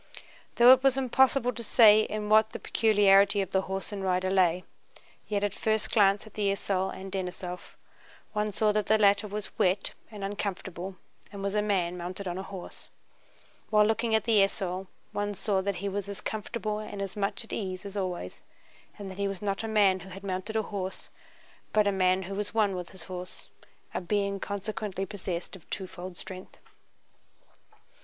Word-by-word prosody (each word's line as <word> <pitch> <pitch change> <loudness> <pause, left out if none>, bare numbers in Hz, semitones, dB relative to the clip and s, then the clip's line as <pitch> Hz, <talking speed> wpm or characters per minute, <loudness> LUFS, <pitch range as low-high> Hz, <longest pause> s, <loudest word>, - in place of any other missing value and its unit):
Though 240 +1 +8
it 260 - +3
was 270 -1 +3
impossible 265 -1 +3
to 235 - -6
say 215 -1 +7
in 215 -1 -3
what 220 +1 +4
the - - -5
peculiarity 200 -2 +4
of 195 - -2
the 190 - +2
horse 190 +2 -5
and 200 -2 -4
rider 185 0 +1
lay, 185 -2 +3 0.6
yet 205 -1 -1
at 205 -1 0
first 220 0 0
glance 200 -1 +4
at 215 - -14
the 205 -2 0
esaul 190 -1 -1
and 190 0 -7
Denísov 180 -1 -5 0.6
one 210 0 0
saw 210 +1 +2
that 210 -1 0
the 220 - +5
latter 205 0 +4
was 210 0 -6
wet 185 +2 +2 0.2
and 210 -3 -8
uncomfortable 195 -2 -4 0.4
and 200 -1 -7
was 200 0 -1
a 210 - +2
man 180 -4 0
mounted 180 +3 -5
on 180 +1 -3
a - - -2
horse, 190 -2 -9 0.8
while 210 -1 +5
looking 225 +1 +1
at 220 - +2
the 220 -3 +4
esaul 190 -1 -2 0.2
one 205 0 -2
saw 195 0 0
that 200 0 -1
he - - +1
was 200 +1 -3
as 200 - -5
comfortable 215 0 -3
and 210 -1 -7
as 195 -1 -4
much 200 +2 -2
at 225 - -10
ease 185 -2 -4
as 200 0 -7
always 180 - -4 0.6
and 200 -2 -7
that 190 - -10
he 200 - +1
was 195 -2 -4
not 200 +2 -2
a - - -2
man 205 -4 +4
who 190 +2 -11
had 195 +1 -9
mounted 190 +3 -3
a 220 - +2
horse, 190 -2 -5 0.6
but 215 -1 +4
a 200 - +3
man 185 -1 +2
who 190 +2 -6
was 205 +2 -4
one 205 -4 +3
with 180 -1 -5
his 190 -3 -12
horse, 180 0 -8 0.4
a - - -2
being 200 +1 0
consequently 200 -1 -4
possessed 185 -3 -5
of 185 - -16
twofold 185 -1 -6
strength. 185 -1 -9
200 Hz, 190 wpm, -29 LUFS, 190-210 Hz, 0.8 s, Though